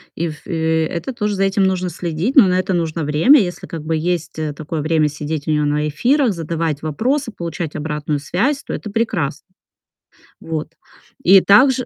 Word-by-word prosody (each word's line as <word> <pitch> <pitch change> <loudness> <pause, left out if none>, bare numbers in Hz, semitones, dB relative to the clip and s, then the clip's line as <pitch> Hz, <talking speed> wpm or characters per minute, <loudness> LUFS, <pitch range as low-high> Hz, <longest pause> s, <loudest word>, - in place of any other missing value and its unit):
И 170 +1 -1
в 155 - -11
э, 160 -2 +1
это 175 +11 -4
тоже 210 -3 -1
за 195 - 0
этим 195 0 +1
нужно 185 -1 0
следить, 175 - -3
но 245 -8 +8
на 180 0 +2
это 190 +1 -1
нужно 165 -2 -1
время. 160 - +5
Если 180 -3 -4
как 165 -3 -6
бы 160 +1 -1
есть, 170 0 -2
э, 150 -2 -2
такое 155 +1 -5
время 155 0 +2
сидеть 150 +1 -5
у - - +1
него 150 -1 +1
на 150 +1 0
эфирах, 245 - +2
задавать 165 -2 -3
вопросы, 240 - -1
получать 170 -4 -5
обратную 150 -1 -2
связь, 235 - -1
то - - -8
это 210 - -6
прекрас 200 -11 -1 1.0
Вот. 160 0 -5 0.5
И 190 +1 +7
также 255 +5 +5
165 Hz, 185 wpm, -19 LUFS, 155-200 Hz, 1.0 s, но